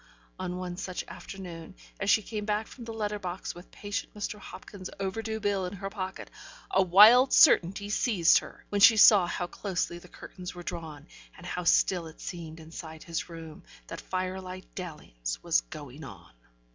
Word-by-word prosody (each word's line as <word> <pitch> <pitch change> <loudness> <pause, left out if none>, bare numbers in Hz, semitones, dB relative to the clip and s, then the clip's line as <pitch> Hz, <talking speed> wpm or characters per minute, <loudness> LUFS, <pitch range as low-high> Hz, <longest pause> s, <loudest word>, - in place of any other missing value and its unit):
On 180 -1 -3
one 180 -1 -5
such 185 -1 -4
afternoon, 180 -3 -9 0.2
as 195 - -1
she 215 - +5
came 210 +1 -4
back 210 +1 -1
from 240 +1 -11
the 230 - -6
letter 210 -2 -3
box 185 -1 -5
with 175 +1 -13
patient 205 0 -5
Mr. 210 0 -4
Hopkins's 195 -2 -9
overdue 220 +3 -3
bill 200 -3 0
in 180 - -7
her 195 0 -6
pocket, 190 -2 -6 0.4
a - - +4
wild 215 +8 +8
certainty 195 +4 +5
seized 205 -5 +4
her, - - -13
when 205 -1 -1
she 220 +2 +9
saw 200 -4 +8
how 175 - -2
closely 175 -2 -3
the 180 - -15
curtains 180 +1 -9
were 175 - -8
drawn, 160 -4 -7 0.3
and - - -12
how 180 - -3
still 175 -1 +3
it 160 - -13
seemed 165 -3 -7
inside 160 0 -9
his 165 +1 -4
room, 165 -2 -9 0.2
that - - -7
firelight 185 0 -4
dalliance - - -6
was - - +3
going 140 - -10
on. 90 - -11
185 Hz, 175 wpm, -29 LUFS, 165-205 Hz, 0.4 s, she